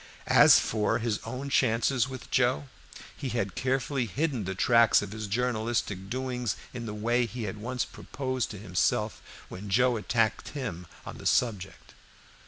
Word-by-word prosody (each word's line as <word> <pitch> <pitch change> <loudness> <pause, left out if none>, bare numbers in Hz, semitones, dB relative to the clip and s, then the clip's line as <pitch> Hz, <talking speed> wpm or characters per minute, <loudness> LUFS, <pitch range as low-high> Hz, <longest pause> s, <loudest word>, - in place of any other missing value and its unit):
As - - +7
for 105 -2 +1
his 110 -2 -1
own 130 +4 -5
chances 125 +1 +2
with 130 -2 -9
Joe, 75 - +2 0.5
he 135 - -4
had 110 -6 -2
carefully 130 -1 -1
hidden 135 - -1
the 95 +1 -3
tracks 115 +1 +5
of 100 - -7
his 110 -1 -5
journalistic 110 -3 -1
doings 125 -3 -2 0.2
in 120 -1 -5
the 105 - -4
way 120 +3 +1
he 120 +1 -6
had 105 0 -4
at - - -11
once 125 +2 -2
proposed 130 -2 -4
to 105 - -7
himself 95 +2 0 0.3
when 100 +3 -8
Joe 125 +4 +3
attacked 110 +1 0
him 90 -10 -5 0.2
on - - -8
the - - -3
subject. 100 -6 -1
115 Hz, 165 wpm, -28 LUFS, 105-125 Hz, 0.5 s, As